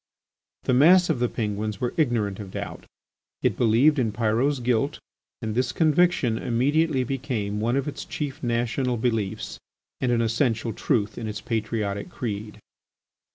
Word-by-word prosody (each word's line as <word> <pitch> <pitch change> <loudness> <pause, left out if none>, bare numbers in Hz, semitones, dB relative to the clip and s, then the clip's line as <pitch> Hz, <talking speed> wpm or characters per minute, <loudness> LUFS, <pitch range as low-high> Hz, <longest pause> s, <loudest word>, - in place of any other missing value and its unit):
The - - +1
mass 175 +7 +6
of 140 - -1
the 125 -1 +1
Penguins 105 -1 -3
were 125 - -1
ignorant 115 - 0
of 100 -2 -7
doubt: - - -6 0.6
it - - +2
believed 125 +6 +4
in 115 -4 +1
Pyrot's 120 +6 +1
guilt 125 +3 0 0.5
and 110 -1 -2
this 125 +1 +1
conviction 155 -7 +2
immediately 140 +4 +1
became 120 -6 -2
one 115 +3 +1
of 140 - -1
its 145 - -5
chief 145 0 -5
national 120 +1 0
beliefs 110 -3 -2 0.4
and 125 - +1
an 115 -1 +2
essential 115 -1 0
truth 105 0 0
in 115 - -4
its 105 -1 -4
patriotic 110 - -2
creed. 110 -8 -5
120 Hz, 150 wpm, -25 LUFS, 110-135 Hz, 0.6 s, mass